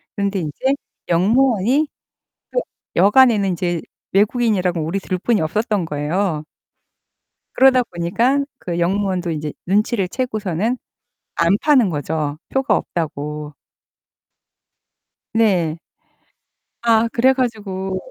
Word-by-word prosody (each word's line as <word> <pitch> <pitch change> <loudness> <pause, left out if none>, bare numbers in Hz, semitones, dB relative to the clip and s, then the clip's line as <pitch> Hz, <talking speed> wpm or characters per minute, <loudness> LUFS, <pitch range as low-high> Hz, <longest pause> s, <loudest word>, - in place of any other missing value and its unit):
그런데 200 -1 -1
인제 175 - -1 0.3
역무원이 235 - +3 0.6
표 - - +1 0.4
역 200 +6 +4
안에는 230 -7 +6
인제 175 -1 -1 0.3
외국인이라고 200 -4 +2
우리 165 +5 -1
둘뿐이 195 +4 0
없었던 205 +4 0
거예요. 155 +2 -1 1.1
그러다 260 -1 +5
보니깐 230 +9 0
그 175 -6 -4
역무원도 185 0 0
인제 150 -2 -4
눈치를 200 +1 +1
채고서는 215 -2 -2 0.6
안 170 +4 +3
파는 265 -9 +4
거죠. 150 -1 -2
표가 265 +1 +1
없다고. 150 -2 -4 1.8
네. 185 -8 +2 1.1
아, 230 0 +4
그래 255 +3 +4
가지고 205 -7 -2
195 Hz, 230 characters per minute, -20 LUFS, 170-230 Hz, 1.8 s, 안에는